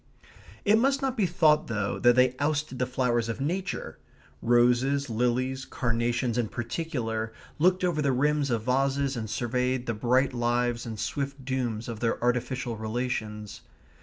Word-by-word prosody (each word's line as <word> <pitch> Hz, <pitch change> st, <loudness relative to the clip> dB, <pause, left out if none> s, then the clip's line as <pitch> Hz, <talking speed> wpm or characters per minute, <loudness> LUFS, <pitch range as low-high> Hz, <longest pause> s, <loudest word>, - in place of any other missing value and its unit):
It 215 Hz, +1 st, +5 dB
must 275 Hz, +3 st, +2 dB
not 265 Hz, -2 st, 0 dB
be 210 Hz, -6 st, +2 dB
thought, 155 Hz, -3 st, +3 dB
though, 105 Hz, -3 st, -2 dB
that 120 Hz, 0 st, +5 dB
they 130 Hz, 0 st, +4 dB
ousted 145 Hz, -2 st, -1 dB
the 125 Hz, -, +1 dB
flowers 120 Hz, -3 st, 0 dB
of 115 Hz, -, -3 dB
nature. 180 Hz, +7 st, -3 dB, 0.4 s
Roses, 125 Hz, +3 st, +3 dB
lilies, 125 Hz, +3 st, 0 dB
carnations 120 Hz, -1 st, -1 dB
in 115 Hz, -, 0 dB
particular, 115 Hz, -3 st, -3 dB, 0.3 s
looked 185 Hz, +3 st, +3 dB
over 170 Hz, -4 st, +1 dB
the 140 Hz, -2 st, +2 dB
rims 145 Hz, +2 st, +1 dB
of 115 Hz, -3 st, 0 dB
vases 135 Hz, +2 st, +1 dB
and 110 Hz, -3 st, -4 dB
surveyed 125 Hz, +2 st, -1 dB
the 120 Hz, -, -1 dB
bright 125 Hz, +5 st, +2 dB
lives 120 Hz, 0 st, 0 dB
and 110 Hz, -2 st, -6 dB
swift 140 Hz, +1 st, -3 dB
dooms 120 Hz, -4 st, -2 dB
of 115 Hz, -2 st, -5 dB
their 115 Hz, -1 st, 0 dB
artificial 125 Hz, -1 st, -1 dB
relations. 110 Hz, -2 st, -4 dB
125 Hz, 155 wpm, -27 LUFS, 120-140 Hz, 0.4 s, It